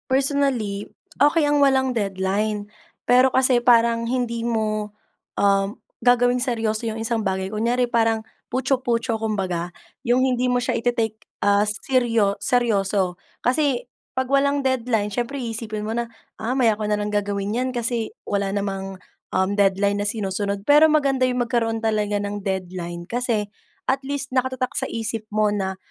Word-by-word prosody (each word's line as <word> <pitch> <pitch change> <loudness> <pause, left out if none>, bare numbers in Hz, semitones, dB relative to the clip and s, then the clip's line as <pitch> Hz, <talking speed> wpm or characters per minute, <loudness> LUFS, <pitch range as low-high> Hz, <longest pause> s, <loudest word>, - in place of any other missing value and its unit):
Personally 260 -7 +1 0.3
okey 295 +3 +5
ang 290 0 +2
walang 265 -2 +3
deadline. 205 0 -1 0.4
Pero 255 +1 +5
kasi 260 -2 +4
parang 235 -1 +3
hindi 240 -2 -1
mo, 215 -2 -1 0.4
um, 200 +1 +2 0.3
gagawing 245 0 +4
seryoso 225 -3 -1
yung 220 - -4
isang 225 0 -1
bagay 190 -1 -2
kunyari 235 +3 +1
parang 225 -2 +1 0.2
puchu-puchu 245 -3 0
kumbaga, 190 -6 -2 0.3
yung 250 0 +2
hindi 250 -1 +1
mo 250 - +2
siya 245 - 0
ite-take 230 -2 -1 0.2
as 205 +1 +3
seryo 230 -6 +2
seryoso 200 -6 +1 0.3
kasi 265 -1 +1 0.3
kapag 260 -1 0
walang 280 +1 +3
deadline 235 -5 +1
siyempre 245 +5 -2
iisipin 225 -2 -4
mo 220 - -2
na, 235 0 -2 0.3
ah, 225 +3 -3
maya 245 -4 +3
ko 215 - -5
nalang 210 0 0
gagawin 205 0 -1
iyan 255 +1 0
kasi 235 -2 -2 0.2
wala 200 -1 0
namang, 195 -1 -3 0.3
um, 190 0 +1
deadline 200 0 +2
na - - 0
sinusunod 200 -1 -2
pero 300 +3 +6
maganda 275 -3 +2
yung 250 -1 0
magkaroon 230 -1 0
talaga 210 -2 +1
ng 205 0 -4
deadline 180 -3 -4
kasi, 230 -3 -1 0.4
at 270 +1 +1
least 275 -1 -4
nakatatak 255 0 0
sa 265 -3 -1
isip 225 -1 -3
mo 215 0 +2
na 190 -2 -2
225 Hz, 150 wpm, -23 LUFS, 205-250 Hz, 0.4 s, pero